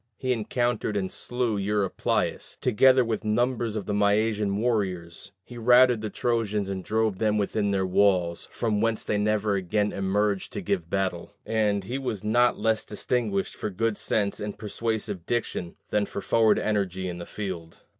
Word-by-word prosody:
He 130 -1 0
encountered 115 -1 -1
and 95 -2 -2
slew 120 -3 -1
Eurypylus, 100 -1 -1
together 130 +2 +4
with 115 -1 -2
numbers 115 +1 0
of 105 - -3
the 105 - -2
Mysian 105 0 +2
warriors: 95 -6 -2
he 120 +1 -10
routed 125 0 +5
the 110 - -3
Trojans 105 -4 -1
and 95 -1 -4
drove 110 -2 0
them 105 -1 +2
within 105 0 0
their 95 -1 +1
walls, 90 -3 +2
from 105 -3 -1
whence 115 -1 0
they 105 - 0
never 105 0 +1
again 100 +2 0
emerged 100 0 0
to - - -3
give 90 -2 -2
battle: 95 -3 -2
and 105 -3 +1
he 125 +8 -4
was 110 -7 -4
not 120 +3 +3
less 110 -1 +1
distinguished 105 -2 -1
for - - -3
good 110 +3 -1
sense 100 -1 0
and 105 0 -5
persuasive 105 -4 -3
diction 110 -7 -2 0.2
than 105 -1 +1
for 100 - -6
forward 110 -2 +4
energy 95 -3 -1
in 90 -1 -5
the 85 - -7
field. 90 -6 -6
105 Hz, 165 wpm, -26 LUFS, 100-115 Hz, 0.2 s, routed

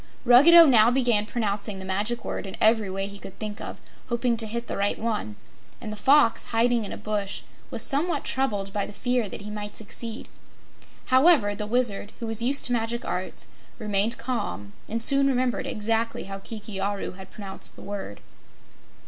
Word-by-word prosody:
Ruggedo 315 +8 +9
now 235 -6 +6
began 240 -5 +2
pronouncing 210 -3 -2
the 190 - -8
Magic 210 +5 -2
Word - - -4
in 190 - -8
every 220 -2 +3
way 195 +1 -1
he 200 0 -8
could 195 - -11
think 215 -1 -5
of, - - -7 0.3
hoping 235 0 +1
to 225 -1 0
hit 235 +2 -4
the - - -5
right 200 +1 0
one, 215 - -3 0.4
and 215 - -6
the - - -5
Fox, 265 +2 +4
hiding 235 0 +1
in - - -6
a - - -5
bush, 205 -2 -3 0.3
was - - -2
somewhat 310 +5 0
troubled 205 -7 -1
by 205 -1 -1
the - - -10
fear 245 -2 -1
that - - -7
he 210 +1 -7
might 210 0 -6
succeed. 225 +2 -4 0.9
However, 260 -7 +5
the 210 +1 -5
Wizard, 220 -3 0
who 235 - -4
was 225 0 -1
used 270 +4 +2
to 245 - +3
magic 235 +1 -2
arts, 180 +1 -4 0.3
remained 210 +1 +1
calm 100 - -4 0.2
and 230 +1 -1
soon 275 +2 +4
remembered 255 -2 0
exactly 225 +2 -1
how 195 0 -7
Kiki 210 -1 -7
Aru 200 +1 -2
had 190 0 -12
pronounced 195 -1 -5
the - - -12
word. 200 - -6
220 Hz, 185 wpm, -25 LUFS, 200-240 Hz, 0.9 s, Ruggedo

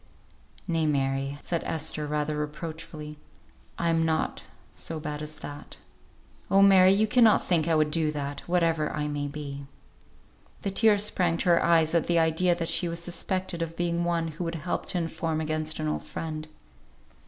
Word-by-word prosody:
"Nay, 165 -3 +1
Mary," 135 -1 0
said 170 -2 -2
Esther, 155 -1 -2
rather 150 0 -1
reproachfully, 150 0 -6 0.6
"I 170 - 0
am 165 0 +2
not 160 - -1 0.3
so 165 -1 -5
bad 150 0 -5
as 155 0 -6
that. 145 -1 -9 0.7
Oh! 195 0 +5
Mary, 190 -1 +7
you 205 +3 +3
cannot 230 -1 +5
think 165 -3 +2
I 165 - +3
would 155 -1 +2
do 160 -1 +1
that, 145 -1 -4
whatever 165 -3 +1
I 150 0 -2
may 145 -1 -2
be." 140 -1 -7 1.0
The 195 - -1
tears 205 0 +4
sprang 180 -5 +1
to 175 - 0
her 170 -1 +4
eyes 165 -2 +3
at 170 -2 +2
the 170 - +2
idea 165 +2 +3
that 165 -1 -3
she 175 - +4
was 170 0 -3
suspected 175 0 -3
of 165 0 -4
being 170 0 0
one 170 -1 0
who 160 +3 -6
would 165 0 -3
help 165 +2 -3
to - - -1
inform 165 -1 -2
against 155 0 -2
an 155 - -1
old 150 - -1
friend. 155 -1 -6
160 Hz, 175 wpm, -27 LUFS, 150-170 Hz, 1.0 s, Mary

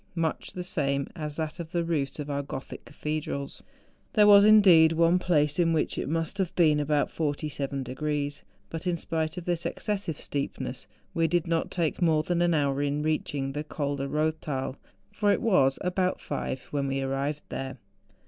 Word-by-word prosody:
much 165 -2 -2
the 180 - -4
same 140 -7 0
as 150 -3 -5
that 160 +1 -4
of 165 -2 -5
tlie 170 0 -1
roofs 145 -5 -1
of 150 -1 -5
our 140 -1 -1
Gothic 135 -1 -7
cathedrals. 150 -2 -4 0.5
There 210 -2 +6
was, 200 -1 +8
indeed, 185 -7 +7
one 170 +2 +4
place 150 -3 +2
in 165 -1 +3
which 155 - 0
it - - -3
must 165 +5 -2
have 185 -3 -1
been 155 -4 +4
about 150 0 +1
47 145 -3 -2
degrees. 145 +2 -3 0.3
But 165 +2 -5
in 175 -1 +1
spite 160 0 -2
of 175 - -5
this 175 -1 0
excessive 195 -7 -2
steepness, 140 -1 -4 0.3
we 165 0 +2
did 175 +1 +1
not 165 -1 0
take 170 0 -1
more 160 -3 +3
than 175 +1 0
an 175 -1 +3
hour 140 -2 +1
in 145 +1 0
reaching 145 -3 -1
the 145 +2 -3
Col 145 -2 -3
de 135 0 -3
Koththal, 150 -3 -2 0.4
for 205 -2 +2
it - - +2
was 140 -12 +3
about 180 0 0
five 135 -2 -4
when 140 -1 -1
we 135 0 -1
arrived 135 +2 -2
there. 135 0 -5
155 Hz, 185 wpm, -27 LUFS, 140-170 Hz, 0.5 s, was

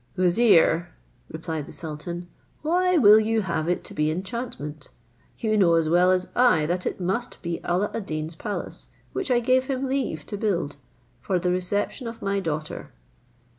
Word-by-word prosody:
"Vizier," 175 -3 +4 0.4
replied 160 -2 -5
the - - -10
sultan, 170 +2 -6 0.4
"why 360 +3 +2
will 215 -6 +8
you 220 0 +1
have 170 -4 -2
it 175 - 0
to - - -9
be 150 0 +1
enchantment? 165 - -5 0.5
You 215 -1 0
know 170 -4 +5
as 165 -1 +2
well 175 +2 +4
as 185 0 +2
I 245 -11 +4
that 175 +3 -1
it - - -3
must 190 +7 -2
be 170 -1 -3
Alla 185 +4 0
ad 215 -4 -4
Deen's 155 +1 -3
palace, 205 +5 -6 0.2
which 390 - -3
I 245 -1 +4
gave 255 +2 +2
him 270 -1 -1
leave 260 - -2
to 205 - -5
build, 180 -9 -1 0.4
for 185 +8 0
the 180 0 0
reception 205 +7 -1
of 230 0 -7
my 200 0 0
daughter. 155 -4 -4
185 Hz, 170 wpm, -25 LUFS, 165-225 Hz, 0.5 s, will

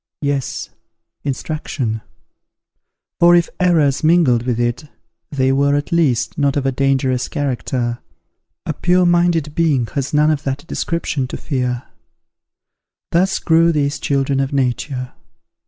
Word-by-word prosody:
Yes, 140 -2 -2 0.5
instruction; 135 -5 -3 1.2
for 175 0 +6
if 170 -1 +2
errors 160 -7 +2
mingled 150 -8 +3
with 120 -2 0
it, 120 +5 -1 0.4
they 130 -2 +1
were, 140 +1 +2
at 145 0 -2
least, 150 -7 +1
not 140 -1 +1
of 140 - -1
a 135 - +2
dangerous 130 -1 0
character. 125 -3 -2 0.7
A - - -2
pure 180 +1 +2
minded 170 -3 +2
being 150 -8 +2
has 140 -1 -2
none 150 +1 +3
of 150 -2 -1
that 135 +2 -4
description 165 -6 -2
to - - -6
fear. 125 -4 -2 1.3
Thus 185 +3 +2
grew 165 +1 +3
these 145 -2 0
children 135 -1 0
of 135 0 -1
nature. 130 -1 -2
140 Hz, 130 wpm, -18 LUFS, 130-160 Hz, 1.3 s, for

